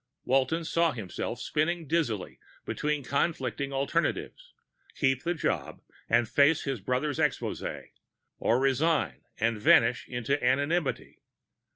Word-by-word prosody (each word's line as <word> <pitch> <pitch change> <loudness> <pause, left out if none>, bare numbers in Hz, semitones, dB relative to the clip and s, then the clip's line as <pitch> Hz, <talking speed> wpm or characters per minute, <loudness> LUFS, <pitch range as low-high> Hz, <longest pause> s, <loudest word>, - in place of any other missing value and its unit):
Walton 135 +6 +1
saw 165 0 +2
himself 105 -7 -5
spinning 165 +3 -1
dizzily 140 - -1 0.3
between 150 -1 -1
conflicting 140 +1 -1
alternatives. 165 - -2 0.4
Keep 135 -2 +1
the 175 +1 -1
job 155 - -2 0.3
and 120 0 +3
face 145 +6 +3
his 135 -4 -2
brother's 130 +8 -1
exposé? 150 -4 -2 0.5
Or 120 - +2
resign, 135 - +1 0.2
and 110 -1 0
vanish - - +4
into 125 +3 -2
anonymity. 145 +5 0
140 Hz, 110 wpm, -28 LUFS, 125-160 Hz, 0.5 s, vanish